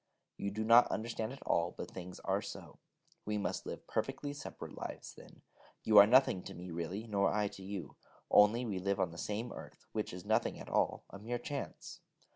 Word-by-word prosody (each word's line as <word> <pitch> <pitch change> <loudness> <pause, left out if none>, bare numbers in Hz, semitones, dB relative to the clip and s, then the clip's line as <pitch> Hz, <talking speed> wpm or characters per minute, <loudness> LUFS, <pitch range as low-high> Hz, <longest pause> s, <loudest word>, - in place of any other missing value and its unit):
You 100 - -3
do 110 +2 -3
not 115 +2 +7
understand 115 0 -3
at 135 - -10
all 85 +1 +1
but - - -6
things 90 0 -8
are - - 0
so. - - -9 0.4
We 105 0 -1
must 95 -2 -2
live - - -6
perfectly 145 -1 -2
separate 145 - -8
lives, - - -6
then. - - -16 0.4
You 105 -2 +8
are 100 - +10
nothing 125 -6 +5
to - - -7
me, 90 +1 -8
really, 85 +6 -4
nor 100 -3 +2
I 105 -1 +1
to 95 - -11
you, 95 -5 -6 0.3
only 105 +4 +6
we 100 -5 -2
live 100 +1 0
on 90 -3 +1
the 85 - -9
same 110 +3 -3
earth, - - -11
which 110 -1 -2
is 90 +1 -8
nothing 110 +2 +1
at - - -9
all - - +1
a 100 - -9
mere 120 +4 -3
chance. 140 +3 -6
105 Hz, 205 wpm, -34 LUFS, 95-115 Hz, 0.4 s, are